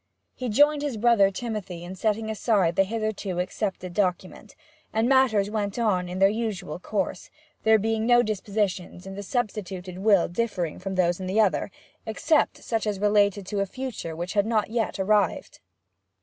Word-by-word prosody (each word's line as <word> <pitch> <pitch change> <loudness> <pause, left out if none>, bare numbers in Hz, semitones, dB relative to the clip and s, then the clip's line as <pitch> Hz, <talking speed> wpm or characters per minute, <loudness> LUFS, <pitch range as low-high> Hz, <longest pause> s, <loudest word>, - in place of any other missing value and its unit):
He 255 -1 -4
joined 290 +6 +4
his 285 -6 -2
brother 220 -3 +4
Timothy 195 -5 -5
in 175 +1 -7
setting 220 +3 -1
aside 200 -6 +1
the 195 - +4
hitherto 215 -3 -3
accepted 185 -1 -3
document, 185 +2 -2 0.4
and 225 +2 +1
matters 240 -7 +3
went 205 -1 -2
on 190 -6 +1
in 180 - -5
their 195 - +5
usual 200 -6 -3
course, 190 -2 -3 0.3
there 220 0 +5
being 220 +1 -1
no 240 0 +6
dispositions 200 -4 -2
in 195 - -7
the 200 - -6
substituted 190 -5 -4
will 200 -3 +4
differing 180 -4 -2
from 190 +1 -4
those 175 -1 +2
in 185 - -5
the 195 +4 +1
other, 210 -2 +2 0.4
except 300 +8 +1
such 225 -2 -1
as 205 -2 -1
related 205 -1 +2
to 200 +2 -3
a 200 - 0
future 245 -9 -5
which 175 +2 -4
had 205 0 +2
not 220 -2 0
yet 230 -2 -1
arrived. 205 +2 +1
205 Hz, 170 wpm, -25 LUFS, 185-220 Hz, 0.4 s, no